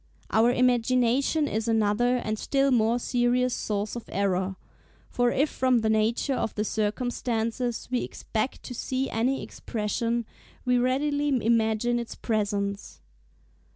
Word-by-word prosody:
Our 225 Hz, +2 st, +4 dB
imagination 250 Hz, +4 st, +2 dB
is 220 Hz, -1 st, -2 dB
another 225 Hz, +3 st, +2 dB
and 215 Hz, -3 st, -3 dB
still 275 Hz, 0 st, +1 dB
more 230 Hz, -1 st, +3 dB
serious 245 Hz, +1 st, +1 dB
source 210 Hz, +1 st, -2 dB
of 235 Hz, -, -8 dB
error; 190 Hz, -1 st, 0 dB, 0.6 s
for 245 Hz, 0 st, +2 dB
if 280 Hz, +5 st, +2 dB
from 255 Hz, -2 st, +2 dB
the 220 Hz, 0 st, +1 dB
nature 220 Hz, +5 st, +1 dB
of 235 Hz, -, -2 dB
the 210 Hz, -, 0 dB
circumstances 230 Hz, +2 st, -2 dB
we 250 Hz, -, +1 dB
expect 225 Hz, +4 st, -3 dB
to 250 Hz, -, -7 dB
see 260 Hz, +2 st, -2 dB
any 250 Hz, +5 st, 0 dB
expression, 230 Hz, +1 st, -2 dB, 0.4 s
we 250 Hz, -1 st, +3 dB
readily 285 Hz, +4 st, +1 dB, 0.2 s
imagine 230 Hz, +1 st, +2 dB
its 235 Hz, -, -6 dB
presence. 200 Hz, -2 st, -2 dB
235 Hz, 130 wpm, -27 LUFS, 220-250 Hz, 0.6 s, Our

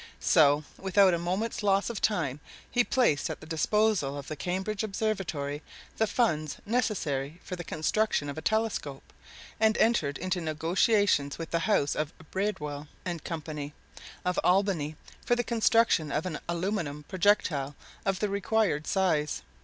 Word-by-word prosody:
So, 150 Hz, -3 st, +4 dB, 0.2 s
without 190 Hz, 0 st, +4 dB
a 170 Hz, -, +1 dB
moment's 190 Hz, +8 st, -2 dB
loss 200 Hz, +2 st, +2 dB
of 220 Hz, -, -5 dB
time, 150 Hz, -10 st, 0 dB, 0.3 s
he 245 Hz, -, +3 dB
placed 230 Hz, -, +2 dB
at -, -, -5 dB
the -, -, -11 dB
disposal 165 Hz, -2 st, +1 dB
of 140 Hz, -, -7 dB
the 155 Hz, -, -3 dB
Cambridge 190 Hz, +7 st, -2 dB
Observatory 195 Hz, -9 st, -2 dB, 0.4 s
the 220 Hz, -, +2 dB
funds 155 Hz, -, 0 dB
necessary 170 Hz, -, -1 dB
for 180 Hz, -, -5 dB
the 175 Hz, -, -6 dB
construction 160 Hz, +1 st, 0 dB
of 140 Hz, -, -4 dB
a 155 Hz, -, -5 dB
telescope, 220 Hz, -11 st, -2 dB, 0.5 s
and 220 Hz, 0 st, +4 dB
entered 165 Hz, -12 st, +2 dB
into 185 Hz, -1 st, -2 dB
negotiations 160 Hz, -1 st, +2 dB
with 165 Hz, -1 st, -6 dB
the 170 Hz, +5 st, 0 dB
house 145 Hz, -9 st, +2 dB
of 155 Hz, 0 st, -2 dB, 0.2 s
Breadwill 150 Hz, -7 st, -2 dB, 0.2 s
and 175 Hz, -4 st, -4 dB
Co., 165 Hz, -3 st, -4 dB, 0.8 s
of 180 Hz, 0 st, +1 dB
Albany, 180 Hz, -5 st, +2 dB, 0.3 s
for 240 Hz, -, +2 dB
the 240 Hz, -, 0 dB
construction 225 Hz, -9 st, +3 dB
of 150 Hz, +4 st, -1 dB
an 170 Hz, -5 st, -3 dB
aluminum 170 Hz, -4 st, -2 dB
projectile 170 Hz, -6 st, +1 dB, 0.3 s
of 195 Hz, -2 st, -1 dB
the 210 Hz, -, +1 dB
required 200 Hz, -5 st, 0 dB
size. 155 Hz, -, +1 dB
180 Hz, 150 wpm, -29 LUFS, 150-210 Hz, 0.8 s, So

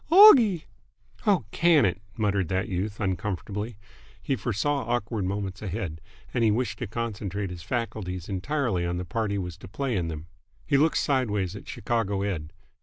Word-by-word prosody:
"Oggie!" 255 Hz, -, +9 dB, 0.6 s
"Oh, 185 Hz, -, +4 dB
can 165 Hz, -7 st, +5 dB
it!" 95 Hz, 0 st, 0 dB, 0.2 s
muttered 100 Hz, -4 st, +1 dB
that 95 Hz, +4 st, 0 dB
youth, 100 Hz, +2 st, -3 dB
uncomfortably. 105 Hz, +2 st, -2 dB, 0.4 s
He 135 Hz, -, -1 dB
foresaw 125 Hz, +6 st, 0 dB
awkward 115 Hz, -4 st, -1 dB
moments 100 Hz, 0 st, -3 dB
ahead, 95 Hz, -6 st, -4 dB, 0.3 s
and 120 Hz, -, +1 dB
he 110 Hz, -, +5 dB
wished 115 Hz, +1 st, 0 dB
to 120 Hz, -, -3 dB
concentrate 105 Hz, -3 st, -3 dB
his 90 Hz, -1 st, -7 dB
faculties 95 Hz, -5 st, -3 dB
entirely 105 Hz, -1 st, -1 dB
on 85 Hz, 0 st, -1 dB
the 90 Hz, -, -3 dB
part 110 Hz, +4 st, -1 dB
he 100 Hz, -, -1 dB
was 90 Hz, -3 st, -4 dB
to -, -, -10 dB
play 130 Hz, +5 st, -2 dB
in 90 Hz, -4 st, 0 dB
them. 80 Hz, -1 st, -5 dB, 0.4 s
He 145 Hz, -, +1 dB
looked 155 Hz, +3 st, +4 dB
sideways 105 Hz, -9 st, +1 dB
at -, -, -10 dB
Chicago 105 Hz, -4 st, -1 dB
Ed. 85 Hz, -6 st, -3 dB
105 Hz, 170 wpm, -27 LUFS, 95-120 Hz, 0.6 s, Oggie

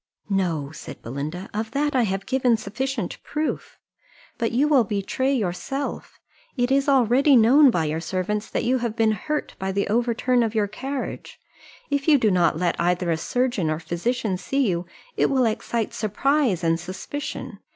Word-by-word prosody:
"No," 165 Hz, -7 st, 0 dB
said 155 Hz, -, -10 dB
Belinda, 150 Hz, -, -5 dB
"of 220 Hz, +1 st, -2 dB
that 290 Hz, -1 st, 0 dB
I 250 Hz, -3 st, +4 dB
have 195 Hz, -1 st, -2 dB
given 255 Hz, -3 st, +2 dB
sufficient 260 Hz, +7 st, -4 dB
proof 305 Hz, 0 st, -3 dB, 0.6 s
but 230 Hz, -, 0 dB
you 270 Hz, +5 st, +2 dB
will 280 Hz, -5 st, +5 dB
betray 210 Hz, +6 st, -1 dB
yourself: 245 Hz, +4 st, -3 dB, 0.4 s
it 245 Hz, +1 st, +1 dB
is 275 Hz, +1 st, +3 dB
already 270 Hz, +2 st, +4 dB
known 260 Hz, +5 st, +7 dB
by 170 Hz, -9 st, +1 dB
your 155 Hz, +1 st, -1 dB
servants 190 Hz, +5 st, -2 dB
that -, -, -1 dB
you 255 Hz, +2 st, +2 dB
have 235 Hz, -2 st, -2 dB
been 225 Hz, -1 st, +3 dB
hurt 300 Hz, +9 st, -3 dB
by 190 Hz, 0 st, -2 dB
the 200 Hz, +1 st, -1 dB
overturn 240 Hz, +2 st, +2 dB
of 225 Hz, -1 st, -1 dB
your 210 Hz, -2 st, +2 dB
carriage; 265 Hz, +6 st, -6 dB, 0.5 s
if 285 Hz, +1 st, 0 dB
you 305 Hz, -2 st, +7 dB
do 220 Hz, -5 st, +2 dB
not 175 Hz, -4 st, +3 dB
let 175 Hz, 0 st, 0 dB
either 175 Hz, 0 st, +1 dB
a -, -, +2 dB
surgeon 240 Hz, -1 st, 0 dB
or 155 Hz, -, 0 dB
physician 185 Hz, +5 st, -2 dB
see 275 Hz, +3 st, 0 dB
you 175 Hz, -2 st, -1 dB, 0.3 s
it -, -, +3 dB
will 260 Hz, -2 st, +3 dB
excite 225 Hz, 0 st, -1 dB
surprise 220 Hz, -, +1 dB
and 165 Hz, 0 st, +2 dB
suspicion. 190 Hz, -, -6 dB
220 Hz, 170 wpm, -24 LUFS, 180-260 Hz, 0.6 s, known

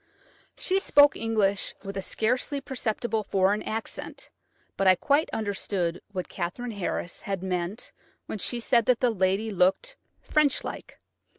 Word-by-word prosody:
She 380 Hz, 0 st, +1 dB
spoke 290 Hz, -6 st, +6 dB
English 215 Hz, -3 st, 0 dB
with 195 Hz, -1 st, -6 dB
a 195 Hz, -, -2 dB
scarcely 250 Hz, +8 st, 0 dB
perceptible 240 Hz, -4 st, -2 dB
foreign 200 Hz, +1 st, +2 dB
accent, 225 Hz, +1 st, -5 dB, 0.4 s
but 195 Hz, -, +1 dB
I 185 Hz, -, +8 dB
quite 290 Hz, -, +2 dB
understood 195 Hz, -5 st, -2 dB
what 185 Hz, -2 st, -4 dB
Katherine 195 Hz, +7 st, -4 dB
Harris 180 Hz, -4 st, -3 dB
had 195 Hz, -2 st, -3 dB
meant 180 Hz, +3 st, -3 dB, 0.3 s
when 215 Hz, -, -5 dB
she 240 Hz, +5 st, -1 dB
said 235 Hz, -1 st, +2 dB
that 250 Hz, -2 st, +4 dB
the 250 Hz, -2 st, +3 dB
lady 195 Hz, +2 st, +1 dB
looked 195 Hz, -, +2 dB, 0.2 s
"French 300 Hz, -3 st, +2 dB
like." -, -, -8 dB
215 Hz, 140 wpm, -27 LUFS, 190-245 Hz, 0.4 s, I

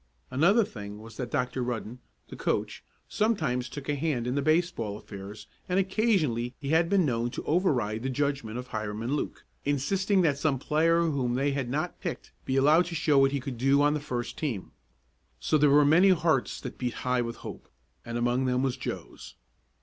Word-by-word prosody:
Another 185 Hz, -, +4 dB
thing 105 Hz, -, -8 dB
was 110 Hz, 0 st, -12 dB
that 125 Hz, -2 st, -4 dB
Dr. 125 Hz, +1 st, -1 dB
Rudden, 120 Hz, 0 st, -4 dB, 0.3 s
the -, -, -8 dB
coach, -, -, -2 dB, 0.2 s
sometimes 155 Hz, -, 0 dB
took 140 Hz, -2 st, -8 dB
a 145 Hz, -, +1 dB
hand 140 Hz, -5 st, -1 dB
in 125 Hz, -, -1 dB
the 140 Hz, -, 0 dB
baseball 155 Hz, -, 0 dB
affairs 105 Hz, +1 st, -9 dB, 0.2 s
and 180 Hz, +1 st, +2 dB
occasionally 185 Hz, -, +1 dB
he 140 Hz, -, -5 dB
had 165 Hz, +2 st, +3 dB
been 195 Hz, -3 st, +3 dB
known 120 Hz, -3 st, 0 dB
to -, -, -6 dB
over 180 Hz, +5 st, +2 dB
ride 110 Hz, -4 st, -1 dB
the 130 Hz, -, -2 dB
judgment 135 Hz, -4 st, -2 dB
of 125 Hz, 0 st, -7 dB
Hiram 110 Hz, 0 st, -4 dB
and 130 Hz, +5 st, 0 dB
Luke, -, -, -4 dB, 0.2 s
insisting 185 Hz, +8 st, +1 dB
that 145 Hz, -4 st, +2 dB
some 145 Hz, -3 st, +1 dB
player 165 Hz, +5 st, +2 dB
whom 135 Hz, -7 st, 0 dB
they 140 Hz, +2 st, +1 dB
had 135 Hz, -3 st, -2 dB
not 145 Hz, +5 st, -2 dB
picked -, -, -5 dB
be 130 Hz, -, -1 dB
allowed 150 Hz, +6 st, +5 dB
to 170 Hz, -, -5 dB
show 150 Hz, -3 st, +3 dB
what 135 Hz, 0 st, +4 dB
he 140 Hz, -, -1 dB
could 130 Hz, -2 st, -6 dB
do 135 Hz, +3 st, +4 dB
on 145 Hz, 0 st, +4 dB
the 150 Hz, -, -1 dB
first 125 Hz, -5 st, -4 dB
team. 125 Hz, -12 st, -3 dB, 0.7 s
So -, -, 0 dB
there 150 Hz, -1 st, +5 dB
were 145 Hz, +1 st, +6 dB
many 170 Hz, +7 st, +6 dB
hearts 160 Hz, -7 st, +2 dB
that -, -, -7 dB
beat 125 Hz, -2 st, -2 dB
high 125 Hz, -1 st, +2 dB
with 115 Hz, -1 st, -4 dB
hope, -, -, -9 dB, 0.3 s
and 115 Hz, 0 st, -4 dB
among 120 Hz, +2 st, +1 dB
them 125 Hz, 0 st, +1 dB
was 130 Hz, -2 st, 0 dB
Joe's. -, -, -7 dB
135 Hz, 205 wpm, -28 LUFS, 120-155 Hz, 0.7 s, were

